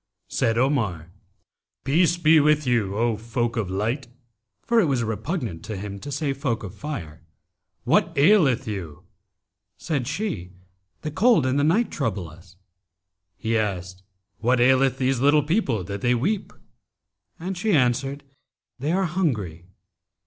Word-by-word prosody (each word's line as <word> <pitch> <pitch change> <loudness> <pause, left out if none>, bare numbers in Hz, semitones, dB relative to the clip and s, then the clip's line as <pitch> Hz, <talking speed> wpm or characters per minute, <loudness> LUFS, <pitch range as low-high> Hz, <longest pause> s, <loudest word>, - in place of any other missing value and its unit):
Said 115 0 0
Omar, 110 - 0 0.7
'Peace 165 +5 +3
be 160 -2 +5
with 150 0 +3
you, 110 -6 0
O 115 0 +1
folk 115 +1 -2
of 110 -6 -2
light 115 +8 -2 0.6
(for 235 -1 +3
it 220 - +4
was 135 -6 0
repugnant 110 - -3
to 110 - -5
him 100 0 -6
to 145 - -7
say 140 0 -1
'folk 135 -5 -2
of 95 - -7
fire'),[FN#277] 85 - -6 0.6
what - - +2
aileth 140 - +4
you?' 90 -6 -6 0.7
Said 145 -8 -2
she, 145 - -4 0.5
'The 150 - -4
cold 200 - +4
and 130 +2 +1
the - - +2
night 195 +10 +2
trouble 105 - -2
us.' 85 +4 -16 0.8
He 110 +4 -1
asked, 95 -4 -2 0.4
'What 125 +2 +2
aileth 130 +2 +4
these 130 -1 +1
little 145 +3 +4
people 145 - 0
that 100 +3 -6
they 125 0 +2
weep?'; 190 - -1 0.9
and 185 +3 -4
she 215 +4 -1
answered, 135 +1 +1 0.6
'They 145 +6 -1
are 190 +1 +2
hungry.' 110 - -2
130 Hz, 145 wpm, -24 LUFS, 105-150 Hz, 0.9 s, be